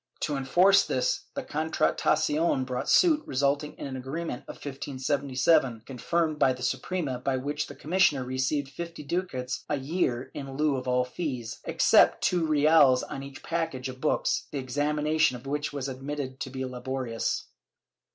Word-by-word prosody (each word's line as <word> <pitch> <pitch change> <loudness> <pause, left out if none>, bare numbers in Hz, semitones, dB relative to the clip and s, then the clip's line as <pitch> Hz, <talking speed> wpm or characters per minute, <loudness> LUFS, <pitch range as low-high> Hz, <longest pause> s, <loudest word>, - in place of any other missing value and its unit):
To 150 -3 -1
enforce 180 +9 +5
this - - -1
the 275 - -3
Contra 160 -7 0
tacion 155 -3 +1
brought 125 -1 -3
suit, 325 -5 +5
resulting 140 +2 0
in - - -6
an 135 -1 -5
agreement 135 +2 -5
in - - -6
1577, 135 -2 0
confirmed 155 +4 -1
by 130 - +4
the 125 0 -8
Suprema, 140 -1 -2
by 130 +1 0
which 145 +3 -3
the 145 - -10
commissioner 155 -2 +2
received 130 +3 -1
fifty 170 +2 -7
ducats 140 -6 -3
a 145 - +1
year 135 -3 -1
in 135 -1 -7
lieu 150 -1 +2
of 130 -1 -4
all 125 0 +2
fees, 125 -4 -4
except - - +4
two 175 -3 +2
reales 150 -3 +5
on 140 -2 -6
each 140 -1 -10
package 160 -6 -2
of 130 0 -9
books, 155 - 0
the 145 - -5
examination 150 +2 +1
of 120 - -15
which 145 +2 -2
was 140 -2 -4
admitted 135 0 -5
to - - -4
be 130 0 -4
laborious.' 125 -2 -3
140 Hz, 160 wpm, -28 LUFS, 130-155 Hz, -, enforce